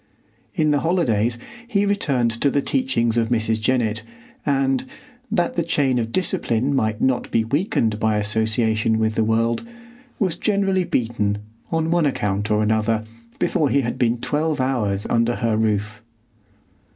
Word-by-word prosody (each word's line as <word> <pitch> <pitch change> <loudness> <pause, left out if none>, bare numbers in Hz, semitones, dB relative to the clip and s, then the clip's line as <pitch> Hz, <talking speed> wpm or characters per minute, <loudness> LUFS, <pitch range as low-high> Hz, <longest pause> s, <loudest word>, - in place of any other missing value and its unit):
In 155 -1 +2
the 145 - +2
holidays 120 - +1 0.3
he 205 -4 +1
returned 140 - +1
to 140 - +4
the 140 0 0
teachings 120 -4 0
of 115 -1 +1
Mrs. 110 -2 +1
Jennett, 115 -2 +1 0.5
and, 135 -1 +1 0.5
that 175 -1 +1
the 170 - +1
chain 140 -6 +1
of 115 -1 -3
discipline 135 -6 +1
might 110 -4 0
not 130 -2 +1
be 115 - +2
weakened 115 - 0
by 110 -1 +1
association 110 +1 +1
with 110 0 +1
the 110 - +1
world, 115 +1 +1 0.5
was 185 -6 0
generally 195 -2 +1
beaten, 110 -7 -1 0.3
on 165 0 0
one 170 -3 +3
account 105 -5 -1
or 105 0 +2
another, 110 +1 +1 0.3
before 155 -7 +1
he 140 - +2
had 120 -2 -3
been 120 -1 +2
twelve 150 +3 -1
hours 110 -6 0
under 115 +1 +1
her 115 -3 0
roof. 105 -1 -1
120 Hz, 150 wpm, -22 LUFS, 110-145 Hz, 0.5 s, to